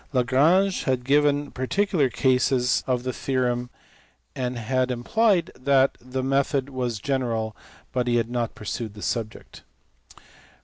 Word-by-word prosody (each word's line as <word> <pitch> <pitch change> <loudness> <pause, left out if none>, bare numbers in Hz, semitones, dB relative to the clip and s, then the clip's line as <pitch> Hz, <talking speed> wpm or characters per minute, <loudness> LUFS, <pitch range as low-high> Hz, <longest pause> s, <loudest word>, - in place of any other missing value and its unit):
Lagrange 150 +10 +3
had 130 -2 0
given 145 +1 +2
particular 155 +2 0
cases 125 0 +2
of 125 -2 0
the 130 0 -3
theorem 125 -2 -1 0.7
and 125 -2 -3
had 130 +3 0
implied 175 - +1
that 135 +1 +2
the 130 +1 -4
method 135 0 0
was 125 -3 -2
general, 115 -3 -2 0.4
but 125 -1 0
he 120 - +2
had 115 0 0
not 120 -2 -2
pursued 105 0 -5
the 105 - -9
subject. 115 -2 -4
130 Hz, 130 wpm, -24 LUFS, 120-140 Hz, 0.7 s, Lagrange